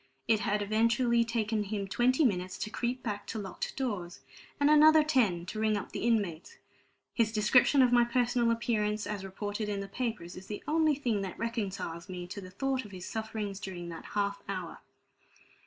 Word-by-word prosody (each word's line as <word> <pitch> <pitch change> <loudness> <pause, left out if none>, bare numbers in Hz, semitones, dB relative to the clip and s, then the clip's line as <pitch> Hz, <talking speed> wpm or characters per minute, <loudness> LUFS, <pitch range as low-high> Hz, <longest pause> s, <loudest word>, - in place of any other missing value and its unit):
It 225 -2 +4
had 210 -1 0
eventually 230 +3 +3
taken 225 -2 -1
him 200 -1 -3
twenty 255 +8 +3
minutes 185 -4 0
to 215 - -4
creep 245 +2 -2
back 205 -3 -4
to - - -4
locked 195 -3 -5
doors, 205 -10 -3 0.4
and 285 - +4
another 305 +1 +7
ten 220 - +2
to 215 +4 -5
ring 215 -1 +2
up 200 - -6
the - - -4
inmates. 205 -8 -1 0.6
His 225 -3 +2
description 245 +5 +5
of 250 - +3
my 240 -1 +6
personal 240 0 +1
appearance, 220 -2 0
as 205 -2 -4
reported 205 +2 -4
in 200 -1 -2
the 200 - -5
papers, 210 -5 -4
is 185 +1 -10
the 210 - -6
only 310 -1 +3
thing 240 -7 -1
that 190 -2 -5
reconciles 200 -7 -4
me 180 -1 -5
to 200 +2 -6
the 185 - -9
thought 265 +7 -1
of 210 - -11
his 185 -2 -8
sufferings 220 -3 -4
during 180 -4 -6
that 165 -1 -8
half 200 -1 0
hour. 185 -4 -5
215 Hz, 190 wpm, -30 LUFS, 195-240 Hz, 0.6 s, another